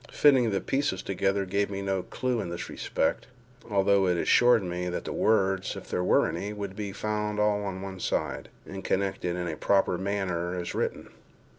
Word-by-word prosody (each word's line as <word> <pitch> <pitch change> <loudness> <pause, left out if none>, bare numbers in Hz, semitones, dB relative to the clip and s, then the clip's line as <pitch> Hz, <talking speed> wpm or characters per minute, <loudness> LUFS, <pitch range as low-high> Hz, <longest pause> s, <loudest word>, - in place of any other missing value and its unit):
Fitting 130 -5 +4
the 100 -3 0
pieces 135 -9 -1
together 95 0 0
gave 100 +2 0
me 100 0 -4
no 95 -1 0
clew 125 +3 -2
in 90 - -5
this 85 0 -5
respect, - - -1 0.4
although 100 -1 +3
it 90 -1 +2
assured 120 +4 +5
me 90 0 -3
that 90 - -3
the - - -3
words 95 -3 +1
(if - - -9
there 90 - 0
were - - +4
any) 100 +5 -4
would 100 -2 -5
be 105 -1 -4
found 105 +1 -2
all 105 -1 +2
on 95 -1 -4
one 95 -1 -7
side, - - -2 0.2
and 95 0 -7
connected 95 -2 -1
in 90 -1 -3
a 80 - -3
proper 95 0 +2
manner, 95 -3 -2
as 90 -1 -4
written. - - -2
95 Hz, 190 wpm, -28 LUFS, 90-105 Hz, 0.4 s, assured